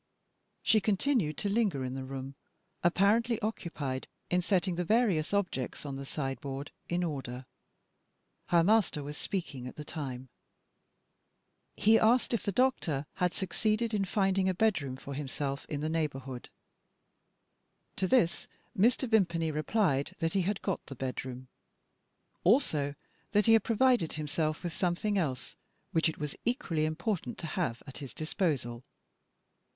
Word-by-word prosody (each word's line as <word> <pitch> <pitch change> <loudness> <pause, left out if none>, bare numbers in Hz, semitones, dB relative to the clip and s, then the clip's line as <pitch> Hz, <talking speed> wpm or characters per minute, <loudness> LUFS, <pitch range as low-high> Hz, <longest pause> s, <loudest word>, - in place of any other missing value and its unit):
She 215 -1 +5
continued 200 - +1
to 205 - -1
linger 200 - +1
in 125 - -4
the 135 0 -4
room, 135 0 -6 0.5
apparently 210 +6 +3
occupied 155 -11 -3 0.2
in 180 0 +3
setting 185 0 +1
the 175 +1 -1
various 195 -6 +2
objects 180 -11 -1
on 140 -2 -4
the 135 0 -6
sideboard 135 0 -4 0.2
in 175 +1 +1
order. 130 -5 -4 1.0
Her 170 -1 +4
master 200 -6 +3
was 145 +1 -6
speaking 150 -9 -3
at - - -8
the 150 - -6
time; 130 -5 -5 1.5
he 220 +2 +5
asked 235 +3 +4
if 230 - +1
the 200 - -1
doctor 185 - +1
had 180 -2 +2
succeeded 215 +4 0
in 205 -2 +2
finding 195 -1 +2
a 185 - 0
bed 215 -3 +3
room 135 -2 -4
for 140 +1 -7
himself 140 0 -3
in 145 -1 -3
the 155 - -1
neighbourhood. 135 -6 -3 1.5
To 190 - +1
this 185 -7 +2 0.3
Mr. 240 +6 +3
Vimpany 170 -8 +2
replied 155 -1 +1
that 165 -2 -1
he 195 - +3
had 195 +2 -1
got 195 - -1
the 135 - -7
bed 130 0 -3
room. 130 0 -7 1.0
Also, 155 - +3 0.4
that 210 0 +4
he 225 - +6
had 225 -2 +6
provided 235 -6 +3
himself 155 +1 -1
with 175 -2 -3
something 190 +3 0
else, 135 -8 -3 0.4
which 165 0 +3
it 160 - -6
was 150 -2 -4
equally 210 - 0
important 160 - -2
to - - -6
have 155 -8 -2
at 135 - -8
his 140 -3 -8
disposal. 145 -7 -1
170 Hz, 150 wpm, -31 LUFS, 140-205 Hz, 1.5 s, he